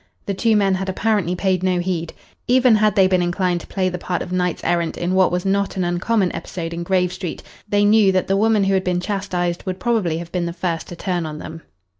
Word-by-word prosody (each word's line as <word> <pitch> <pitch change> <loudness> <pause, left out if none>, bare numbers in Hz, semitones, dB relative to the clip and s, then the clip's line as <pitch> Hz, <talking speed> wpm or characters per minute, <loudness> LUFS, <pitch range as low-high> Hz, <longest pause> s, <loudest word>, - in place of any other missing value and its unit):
The 200 - -2
two 220 +3 +2
men 200 -2 +3
had 190 +1 -2
apparently 190 -3 0
paid 185 0 0
no 185 -1 +1
heed. 175 -2 -2 0.4
Even 250 -1 +5
had 215 -1 +2
they 195 -3 +5
been 185 -1 +2
inclined 175 0 0
to - - -13
play 190 -2 -1
the 180 -1 -3
part 180 0 -2
of - - -9
knights 180 -1 -1
errant 170 -1 0
in 175 +1 -1
what 185 -1 +4
was 180 +1 -1
not 195 0 0
an 185 - +1
uncommon 180 +3 0
episode 170 -2 -5
in 170 - -4
Grave 180 0 +1
Street, 185 -2 -6 0.3
they 205 0 +3
knew 210 -2 +5
that 185 -1 +1
the 195 - +1
woman 215 0 +3
who 195 0 +1
had 190 -1 +2
been 180 -1 0
chastised 180 -3 -2
would 185 0 -3
probably 200 -8 0
have 170 0 -7
been 175 -2 -1
the 170 - -4
first 170 -2 -3
to 175 - -8
turn 175 -2 -2
on 150 -1 -6
them. 165 +1 -8
185 Hz, 245 wpm, -20 LUFS, 175-195 Hz, 0.4 s, Even